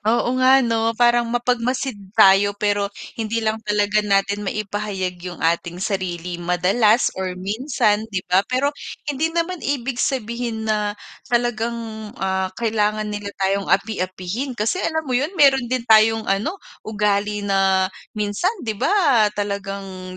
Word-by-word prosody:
Oo 230 +3 +1
nga 260 0 +6
'no, 230 0 0
parang 240 0 +3
mapagmasid 245 +2 0 0.2
tayo 200 +1 +6
pero 205 -1 0 0.3
hindi 220 +1 -2
lang 220 0 0
talaga 210 0 +1
natin 200 0 +1
maipahayag 200 -3 -3
'yung 180 0 -7
ating 170 +1 0
sarili 180 -3 -3
madalas 195 +7 +2
or 185 -1 -3
minsan 215 +1 0
'di 195 -4 -3
ba? 180 +1 +3
Pero 270 +3 +1 0.4
hindi 310 +4 0
naman 335 +1 -2
ibig 270 -3 -2
sabihin 235 -2 -2
na 210 -1 -1 0.3
talagang, 235 -1 0 0.4
ah, 190 0 -1
kailangan 215 -2 0
nila 205 0 -5 0.2
tayong 195 +1 0
api-apihin, 195 +5 -1
kasi 225 - 0
alam 320 -2 -1
mo 260 - -4
'yun 290 +9 0
meron 270 -5 +4
din 255 -1 -1
tayong 220 -1 +5
ano 205 - -1 0.2
ugali 210 -1 -1
na 195 -1 +2 0.3
minsan 210 - 0
'di 220 - -1
ba - - +2 0.5
talagang 195 -2 -5
210 Hz, 135 wpm, -21 LUFS, 195-240 Hz, 0.5 s, nga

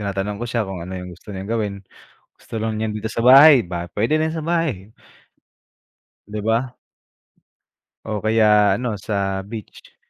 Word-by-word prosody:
Tinatanong 100 +1 -3
ko - - -2
siya 115 -2 -1
kung 95 -2 -6
ano 95 +2 -6
yung 90 0 -8
gusto 90 - -17
niyang 95 +2 -6
gawin 105 -3 -1 0.7
gusto - - -10
lang 110 0 -2
niya 110 - -1
dito 105 +1 -4
sa - - -4
bahay 135 +4 +8
ba 85 -1 -5
pwede 115 +9 +2
na 160 0 0
sa 160 - -4
bahay. 155 - -2 1.4
Di 105 +1 -7
ba? 115 +4 0 1.3
O 105 -1 -3
kaya 105 -2 +4
ano, 120 -3 -3
sa 100 -2 -2
beach. 110 0 -11
110 Hz, 160 wpm, -21 LUFS, 100-115 Hz, 1.4 s, bahay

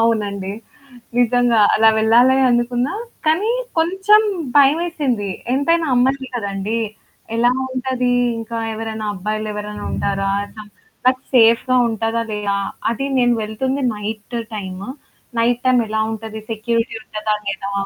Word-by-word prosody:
అవునండి. 205 -4 0 0.7
నిజంగా 245 -1 +3
అలా 225 0 +5
వెళ్ళా‌లే 240 +4 +5
అనుకున్నా. 245 +3 0 0.3
కానీ 355 +8 +2 0.3
కొంచెం 385 +6 +4 0.4
భయమేసింది. 285 - +2 0.2
ఎంతైనా 325 +5 +2
అమ్మాయిని 265 +1 +1
కదండీ 200 0 -2 0.6
ఎలా 240 +1 +4 0.2
ఉంటది? 255 -1 0 0.3
ఇంకా 230 +1 -5 0.2
ఎవరైనా 220 -1 -4
అబ్బాయిలెవరైనా 210 +1 -4
ఉంటారా? 195 0 -1 0.3
ఆహ్, 210 - -16 0.4
నాకు 255 0 +3
సేఫ్‌గా 235 +2 +5
ఉంటదా 225 +1 -1
లేదా? 205 -1 -1 0.3
అది 275 +4 -3
నేను 245 -1 +4
వెళ్తుంది 260 +6 -2
నైట్ 215 +3 -5 0.2
టైము. 190 +1 -6 0.5
నైట్ 240 +1 +2
టైమెలా 225 -4 +2
ఉంటది? 220 0 -6
సెక్యూరిటీ 230 +1 -1
ఉంటదా 215 -1 -2
లేదా? 195 0 -3
230 Hz, 110 wpm, -19 LUFS, 215-255 Hz, 0.7 s, అలా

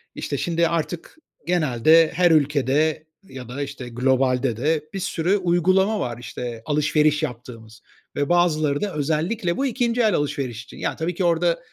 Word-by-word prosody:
işte, - - -4
şimdi 170 0 +1
artık 170 - -4 0.3
genelde 160 -1 +4
her 175 0 +3
ülkede 150 +1 +1 0.2
ya 130 -9 -10
da, 130 +4 -5
işte, 140 -3 -6
globalde 125 -1 +1
de 150 +4 0
bir 195 - -3
sürü 180 +2 0
uygulama 185 +3 +2
var, 120 -2 -3
işte, 120 -1 -7
alışveriş 150 0 +2
yaptığımız 115 -4 -8 0.3
ve 145 0 -1
bazıları 155 -5 +2
da 205 -2 -2
özellikle 165 +6 -1
bu 275 - 0
ikinci 245 -2 0
el 215 -3 +3
alışveriş 130 -5 -3
için. 125 - -14
Yani - - -3
tabii 165 +2 -3
ki 185 - -2
orada 170 0 +2
155 Hz, 160 wpm, -22 LUFS, 130-175 Hz, 0.3 s, genelde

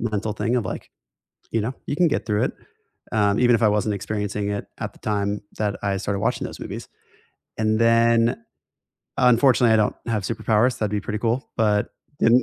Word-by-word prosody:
mental 110 -1 -2
thing 115 +3 -1
of, 115 - 0
like, - - -6 0.6
you 115 - 0
know, 120 +5 -3
"You - - -1
can 175 0 +4
get 145 - -1
through 105 -1 +1
it," - - -1 0.6
um, 105 -2 +2
even 120 -1 +5
if 115 - +1
I 110 - +6
wasn't 105 0 +1
experiencing 105 0 -3
it 100 0 -3
at - - -4
the - - -19
time 105 -1 -1 0.2
that 105 -2 -1
I 100 -1 0
started 100 0 -2
watching - - 0
those - - -9
movies. - - -7 0.7
And 110 0 +1
then, 115 0 +4 0.8
unfortunately 125 -1 +5
I - - +6
don't 105 -1 +2
have 110 -3 -1
superpowers. 110 +4 +1
That'd 105 -2 -1
be 105 - 0
pretty 105 +2 -4
cool, 115 +4 -1
but 105 -2 +2 0.3
in 120 +3 +5
110 Hz, 195 wpm, -23 LUFS, 105-115 Hz, 0.8 s, I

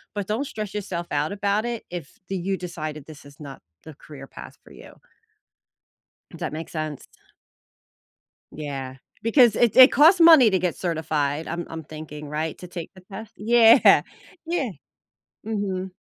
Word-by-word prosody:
But, 205 -1 -3
don't 225 +7 -2
stress 215 -6 -6
yourself 185 -4 -4
out 150 +1 -1
about 200 +1 -1
it, 240 -2 -4
if 175 -5 -8
the 195 - -3
you 190 +2 -2
decided 155 -5 -7
this 155 -2 -13
is 140 0 -16
not 140 -3 -10 0.2
the 160 - -11
career 140 -1 -13
path - - -12
for - - -18
you. - - -14 1.4
Does - - -12
that - - -4
make 160 +1 -6
sense? 155 -3 -6 1.5
Yeah. 135 -3 -6 0.3
Because 230 -1 +4
it 240 -2 +2
it 260 0 +9
costs 325 +6 +5
money 320 -8 +8
to 190 - +1
get 180 -1 -1
certified, 155 -3 -2
I'm 170 +1 -4
I'm 165 0 -7
thinking, 150 -1 -10
right, 155 +1 -4
to 180 - -10
take 175 -2 -8
the 185 - -16
test? 215 +2 -9
Yeah. 230 +1 +6 0.4
Yeah. 330 -6 -2 0.8
Mhm. 195 -4 -3
180 Hz, 160 wpm, -23 LUFS, 155-215 Hz, 1.5 s, it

